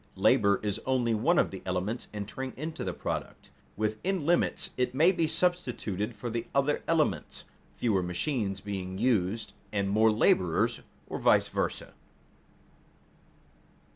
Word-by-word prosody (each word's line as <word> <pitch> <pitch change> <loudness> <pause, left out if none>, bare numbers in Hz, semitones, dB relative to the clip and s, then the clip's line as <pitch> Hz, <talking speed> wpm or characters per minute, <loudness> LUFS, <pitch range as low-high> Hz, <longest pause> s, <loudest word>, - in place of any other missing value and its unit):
Labor 100 -1 +4
is 105 0 -1
only 125 -3 +2
one 140 +11 +2
of - - +3
the 95 - -7
elements 95 +6 -2
entering 110 +6 -5
into 155 +4 -4
the - - -2
product. - - -5 0.3
Within 110 - -1
limits 175 +2 +1
it 125 0 -1
may 165 +6 +6
be 170 -4 0
substituted 125 - -1
for 120 +3 -5
the 115 0 -3
other 140 +1 +2
elements, 155 - 0 0.3
fewer 105 -6 +1
machines 95 - -2
being 95 -2 -5
used 105 -2 0 0.2
and 100 -1 0
more 110 +2 +5
laborers, 90 -5 +2 0.3
or - - -5
vice - - +4
versa. - - -2
110 Hz, 135 wpm, -29 LUFS, 100-140 Hz, 0.3 s, may